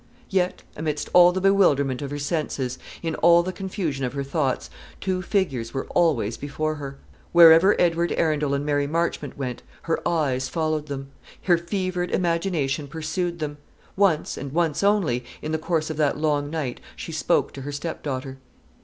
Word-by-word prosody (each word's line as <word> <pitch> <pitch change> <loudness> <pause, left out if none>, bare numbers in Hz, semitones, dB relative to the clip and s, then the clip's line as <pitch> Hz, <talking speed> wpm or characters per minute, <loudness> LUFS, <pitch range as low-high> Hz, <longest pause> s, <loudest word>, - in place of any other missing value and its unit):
Yet, 185 -1 0
amidst 150 -1 -3
all 180 0 +8
the 185 - -2
bewilderment 150 -10 +3
of 140 - -4
her 145 - -4
senses, 145 -4 -2 0.2
in 165 -1 -1
all 170 +1 +6
the 185 +1 -4
confusion 180 -7 -3
of 125 -1 -2
her 140 -1 -2
thoughts, 135 -2 -1 0.3
two 185 -1 -1
figures 145 - -1
were 135 - -2
always 135 -11 +2
before 155 +2 -2
her. 140 -2 -7 0.4
Wherever 170 +3 +8
Edward 170 0 +2
Arundel 150 -3 +1
and 140 +1 -2
Mary 145 -1 +1
Marchmont 165 -1 -2
went, 125 -3 -4 0.2
her 165 - 0
eyes 140 -6 0
followed 155 -2 -1
them 135 -1 -6 0.3
her 175 - +5
fevered 180 +1 -2
imagination 165 -5 0
pursued 160 +4 -3
them. 150 -2 -4 0.4
Once, 190 -6 +2
and 140 - -6
once 165 -3 +1
only, 190 - +2 0.2
in 155 - -5
the 160 - 0
course 160 -1 -1
of 155 - -6
that 150 -2 +1
long 145 -2 0
night 145 -6 -3 0.2
she - - -7
spoke - - +1
to 135 - -8
her 145 +2 -5
stepdaughter. 140 -3 -5
155 Hz, 170 wpm, -24 LUFS, 140-175 Hz, 0.4 s, all